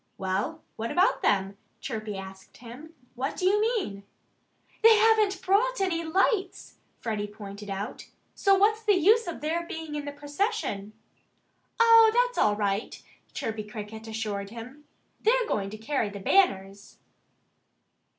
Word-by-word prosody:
"Well, 195 +12 -3
what 230 +1 -3
about 365 +2 +2
them?" 195 0 +1 0.2
Chirpy 215 -5 -5
asked 190 0 -11
him. 255 +7 -12 0.2
"What 260 +3 -4
do 365 - -2
you 410 +3 +3
mean?" 430 - -1 0.8
"They 450 -1 +8
haven't 425 -3 +3
brought 445 +6 +2
any 355 -4 0
lights," 380 +3 -1 0.2
Freddie 210 -3 -3
pointed 205 -1 -10
out. 195 +2 -6 0.2
"So 395 -1 +3
what's 430 +3 +3
the 425 -2 +3
use 425 +6 +4
of 345 - -6
their 325 +3 -1
being 320 -2 -7
in 295 -1 -4
the 285 - -4
procession?" 285 - -3 0.9
"Oh, 455 -1 +7
that's - - +2
all 210 -1 +3
right!" 205 +1 -2 0.4
Chirpy 220 -1 -3
Cricket 215 +1 -9
assured 210 -3 -4
him. 250 +6 -11 0.4
"They're 485 +2 +3
going 195 -1 -1
to 215 - -8
carry 225 0 -1
the 200 0 -8
banners." 195 - +1
285 Hz, 140 wpm, -27 LUFS, -, 0.9 s, They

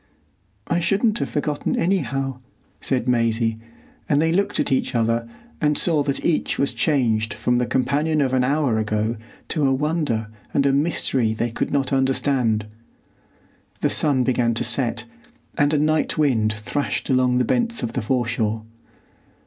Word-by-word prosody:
"I 170 - 0
shouldn't 210 +5 +1
have - - -2
forgotten 145 0 -1
anyhow," 135 -8 -1 0.4
said 130 -2 -1
Maisie, 115 -2 +1 0.5
and 145 - +3
they 160 +1 +2
looked 200 +4 0
at - - 0
each 130 0 0
other 115 0 0 0.3
and 150 -1 +2
saw 160 -4 +3
that 140 -1 -2
each 170 - +1
was 140 - +1
changed 110 -8 +1
from 120 +3 +1
the 125 - 0
companion 150 +4 +1
of 135 -3 +1
an 130 -1 +3
hour 135 -4 +1
ago 110 +1 -1 0.3
to 150 -4 +1
a - - +2
wonder 140 -6 -1 0.3
and 140 - +3
a 140 - +3
mystery 135 -6 +1
they 115 +1 -2
could - - -2
not 140 -1 0
understand. 130 -5 +1 1.2
The - - +1
sun 140 -4 +2
began 120 -2 +1
to - - 0
set, 120 0 0 0.5
and 145 0 +2
a 155 - +2
night 155 +1 +1
wind 120 -8 +2
thrashed 105 +7 -3
along 130 -1 +3
the 125 - +2
bents 235 - 0
of 115 - -3
the 125 - -1
foreshore. 115 -2 -1
130 Hz, 160 wpm, -22 LUFS, 115-150 Hz, 1.2 s, and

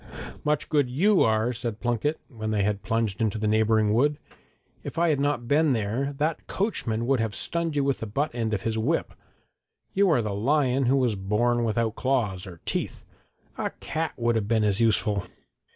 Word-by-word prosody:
'Much 150 0 0
good 145 -5 +2
you 185 +10 +3
are!' 110 +2 +2
said 115 -2 -4
Plunket, 120 +6 -1
when 110 -5 -5
they 105 -2 +1
had 100 0 -1
plunged 110 -1 -1
into 110 -1 0
the 110 0 -1
neighbouring 110 0 +3
wood. 145 +6 +2 0.7
'If - - -7
I 170 0 +3
had 150 -3 +1
not 140 -4 0
been 145 +1 +3
there 120 +6 -1
that 150 +3 -2
coachman 120 - -1
would 135 0 +2
have 110 -3 -1
stunned 165 +8 -1
you 145 - +2
with 140 -1 0
the 110 - -5
butt 140 +8 -1
end 115 -2 -2
of 105 -3 -2
his 110 -1 -1
whip. 145 +9 0 0.8
You 200 0 +3
are 135 -8 +3
the 105 -2 -2
lion 130 +3 +1
who 135 +2 +4
was 125 -5 +1
born 110 +5 +1
without 115 -1 0
claws 110 -8 -1
or 85 -3 -11
teeth! - - -3 0.6
A - - 0
cat 160 0 -3
would 120 0 +1
have 105 -3 0
been 110 -1 +2
as 105 0 +1
useful.' 105 -3 +1
120 Hz, 195 wpm, -26 LUFS, 110-140 Hz, 0.8 s, who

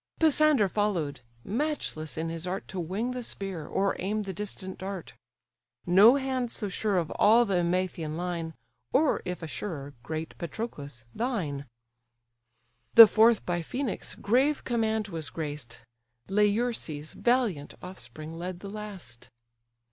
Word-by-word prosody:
Pisander 305 -7 +5
follow'd; 180 - -1 0.2
matchless 225 - -2
in 165 +1 -2
his 165 +1 -5
art 190 +2 -3
To 190 - -4
wing 195 +9 -2
the 250 0 -4
spear, 195 -8 -5
or 195 0 +1
aim 210 +3 -1
the 195 -1 -5
distant 190 -1 -6
dart; 190 -2 -6 0.7
No 200 +8 +7
hand 260 -3 -1
so 205 - -2
sure 200 +1 0
of 165 -3 0
all 230 +3 +6
the 195 -4 +1
Emathian 170 -3 -1
line, 170 -2 -3 0.4
Or 300 +1 +3
if 180 -2 -4
a - - -3
surer, 145 -5 -5
great 160 +6 -5
Patroclus! 145 - -6
thine. 175 - -2 1.3
The 230 - +14
fourth 220 +1 +4
by 175 -1 0
Phœnix' 250 - -4
grave 265 +7 +2
command 220 -3 0
was 160 -4 -4
graced, 145 -7 -6 0.5
Laerces' 205 -7 0
valiant 235 - +1
offspring 155 -3 -8
led 175 +2 -6
the 200 - -7
last. 190 - -8
190 Hz, 135 wpm, -28 LUFS, 160-220 Hz, 1.3 s, The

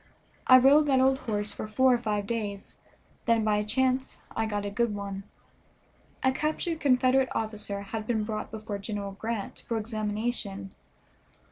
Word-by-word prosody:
I 255 - +10
rode 285 +4 +6
that 265 -2 +4
old 265 +1 +4
horse 205 -1 0
for - - -5
four 260 +4 +4
or 240 - +2
five 210 -3 -1
days, 205 -3 -4 0.5
then 230 -1 +4
by 215 -1 +2
a 210 - +1
chance 260 +4 0 0.2
I 225 0 0
got 205 -1 -2
a 200 - -3
good 225 0 0
one. 200 -1 -5 1.0
A 260 - +4
captured 310 +4 -1
Confederate 260 -2 +3
officer 210 -2 -2
had 215 +2 -5
been 220 -3 +1
brought 215 0 -4
before 215 -2 -5
General 200 -1 -4
Grant 215 +1 -5
for 230 - 0
examination. 210 -2 -3
220 Hz, 160 wpm, -28 LUFS, 205-255 Hz, 1.0 s, I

